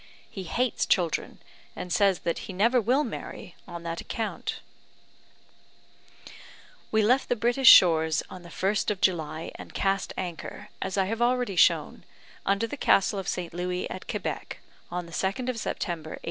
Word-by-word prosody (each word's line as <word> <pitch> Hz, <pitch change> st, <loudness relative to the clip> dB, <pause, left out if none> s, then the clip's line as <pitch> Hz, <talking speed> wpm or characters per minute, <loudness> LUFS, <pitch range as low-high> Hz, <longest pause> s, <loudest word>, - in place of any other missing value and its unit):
He 190 Hz, -2 st, -6 dB
hates 245 Hz, +7 st, 0 dB
children, 175 Hz, -4 st, 0 dB, 0.3 s
and 180 Hz, -, -4 dB
says 195 Hz, -3 st, +3 dB
that 170 Hz, -, -1 dB
he -, -, -4 dB
never 230 Hz, +6 st, +3 dB
will 255 Hz, +7 st, +2 dB
marry 205 Hz, -6 st, -7 dB
on 170 Hz, -1 st, -8 dB
that 170 Hz, 0 st, -4 dB
account." 225 Hz, -1 st, -4 dB, 2.3 s
We 220 Hz, 0 st, +2 dB
left 250 Hz, +6 st, +3 dB
the 245 Hz, -, +2 dB
British 240 Hz, +3 st, +5 dB
shores 160 Hz, -4 st, +6 dB
on 185 Hz, -, -10 dB
the 170 Hz, -, -12 dB
1st 195 Hz, +4 st, 0 dB
of 205 Hz, -3 st, -1 dB
July, 160 Hz, -4 st, 0 dB
and -, -, -11 dB
cast 195 Hz, 0 st, 0 dB
anchor, 175 Hz, -3 st, -6 dB
as 190 Hz, +1 st, -3 dB
I 190 Hz, -, +3 dB
have 225 Hz, +4 st, -3 dB
already 245 Hz, -4 st, +1 dB
shown, -, -, +3 dB, 0.4 s
under 200 Hz, +3 st, +2 dB
the 255 Hz, +6 st, -6 dB
Castle 195 Hz, -4 st, +3 dB
of 190 Hz, -, -6 dB
St. 175 Hz, -2 st, -3 dB
Louis, 180 Hz, +1 st, -2 dB
at 185 Hz, -, -7 dB
Quebec, -, -, -4 dB, 0.3 s
on 175 Hz, 0 st, -4 dB
the 170 Hz, -, -13 dB
2nd 195 Hz, +9 st, -1 dB
of 245 Hz, -3 st, -2 dB
September, 165 Hz, -7 st, -4 dB
1832. -, -, -8 dB
190 Hz, 165 wpm, -27 LUFS, 175-225 Hz, 2.3 s, shores